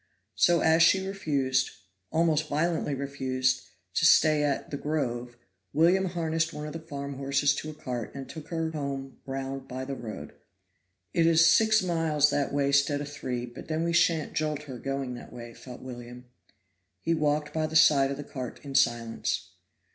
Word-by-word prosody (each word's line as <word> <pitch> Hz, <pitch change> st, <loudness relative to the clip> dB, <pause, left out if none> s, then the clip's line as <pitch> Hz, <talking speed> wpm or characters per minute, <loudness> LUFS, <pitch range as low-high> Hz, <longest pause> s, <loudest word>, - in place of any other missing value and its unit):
So 175 Hz, -1 st, +4 dB
as 160 Hz, +1 st, +4 dB
she 190 Hz, +3 st, +5 dB
refused 140 Hz, -9 st, 0 dB, 0.4 s
almost 160 Hz, -2 st, +1 dB
violently 155 Hz, -1 st, 0 dB
refused 130 Hz, -2 st, -1 dB, 0.3 s
to -, -, 0 dB
stay 155 Hz, -1 st, +6 dB
at 145 Hz, -1 st, -1 dB
"The 140 Hz, -, -2 dB
Grove," 125 Hz, -5 st, -3 dB, 0.4 s
William 175 Hz, +5 st, +4 dB
harnessed 165 Hz, -2 st, -1 dB
one 150 Hz, 0 st, -6 dB
of 150 Hz, -, -6 dB
the 165 Hz, -, -5 dB
farm 140 Hz, -3 st, -6 dB
horses 140 Hz, +1 st, +2 dB
to 155 Hz, -, -4 dB
a 155 Hz, -, -8 dB
cart 125 Hz, -6 st, -4 dB
and 135 Hz, -1 st, -6 dB
took 160 Hz, -2 st, -9 dB
her 165 Hz, -2 st, -2 dB
home 140 Hz, -3 st, -5 dB
round 135 Hz, 0 st, -4 dB
by 130 Hz, +1 st, -5 dB
the 140 Hz, -, -4 dB
road. 115 Hz, -5 st, -7 dB, 0.8 s
"It 165 Hz, -1 st, +3 dB
is 165 Hz, 0 st, +6 dB
six 220 Hz, +4 st, +5 dB
miles 160 Hz, -4 st, +2 dB
that 140 Hz, -1 st, 0 dB
way 140 Hz, -1 st, +1 dB
'stead 140 Hz, +1 st, +3 dB
of 145 Hz, -, -5 dB
three, 125 Hz, -4 st, -4 dB
but 120 Hz, +1 st, -11 dB
then 160 Hz, +1 st, -1 dB
we 170 Hz, 0 st, 0 dB
shan't 165 Hz, -2 st, +2 dB
jolt 150 Hz, -1 st, -1 dB
her 130 Hz, -5 st, -8 dB
going 135 Hz, 0 st, -3 dB
that 120 Hz, -, -10 dB
way," 120 Hz, -1 st, -9 dB
thought 125 Hz, 0 st, -11 dB
William. 125 Hz, -1 st, -9 dB, 0.8 s
He 165 Hz, -, +2 dB
walked 150 Hz, -1 st, 0 dB
by 155 Hz, -1 st, 0 dB
the 160 Hz, -, -7 dB
side 145 Hz, -4 st, +6 dB
of 140 Hz, -, -3 dB
the 145 Hz, -, -5 dB
cart 130 Hz, -3 st, -7 dB
in 140 Hz, -, -6 dB
silence. 115 Hz, -3 st, 0 dB
145 Hz, 180 wpm, -28 LUFS, 130-160 Hz, 0.8 s, stay